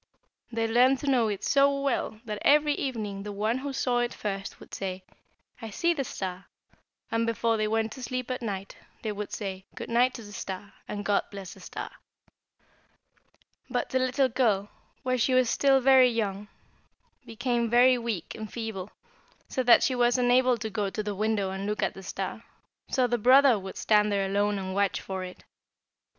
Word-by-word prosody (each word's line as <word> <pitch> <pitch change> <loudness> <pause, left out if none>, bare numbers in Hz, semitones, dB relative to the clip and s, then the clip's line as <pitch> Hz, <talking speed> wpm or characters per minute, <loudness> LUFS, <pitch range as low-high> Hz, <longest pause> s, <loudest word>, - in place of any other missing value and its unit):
They 225 -1 0
learned 250 +4 +4
to 290 - -5
know 250 -5 +3
it 205 -2 -3
so 280 0 +3
well 275 -5 -1
that 210 -2 -5
every 295 0 +4
evening 215 -8 -3
the 205 +1 -6
one 215 +5 -1
who 280 +1 -4
saw 250 -2 0
it 240 0 -1
first 195 -1 -5
would - - -15
say, 190 -1 -4 0.6
'I 225 - -6
see 340 +11 +1
the 285 -4 -2
star,' 185 -5 -6 0.6
and 230 0 +1
before 230 0 +1
they 215 -1 0
went 220 0 0
to 260 - -9
sleep 255 0 -3
at 255 +1 -3
night 200 -4 -5 0.3
they 220 - -1
would 205 0 -5
say 190 -2 -5
'Good - - -7
night' 250 +2 +3
to 235 - -8
the 205 - -11
star, 195 0 -6
and, 205 -1 -5
'God 205 -1 +2
bless 195 -2 -8
the - - -15
star!' - - -7 1.8
"But - - -2
the 260 - +2
little 255 +1 +2
girl, 220 -5 +1 0.3
while 255 -1 +1
she 255 +2 +2
was 255 -2 +3
still 275 -1 +4
very 260 -1 +6
young, 210 -3 -2 0.8
became 235 0 -1
very 245 +2 +5
weak 230 -8 -4
and 215 -1 -7
feeble, 220 -5 -5 0.6
so 260 - -1
that 240 -2 +6
she 260 - +2
was 245 0 +3
unable 250 0 +4
to 220 -1 -5
go 205 -2 -1
to 215 +2 -4
the 210 0 -3
window 205 -1 0
and 195 +1 -4
look 210 -2 -1
at - - 0
the 195 - -10
star, 190 - -5 0.5
so 255 - +2
the 240 0 0
brother 255 0 +6
would 190 0 -8
stand 210 -1 +3
there 200 -1 +1
alone 205 +1 +1
and 190 -1 -4
watch 200 0 +1
for 190 -1 -5
it. 180 0 -9
225 Hz, 195 wpm, -28 LUFS, 200-255 Hz, 1.8 s, very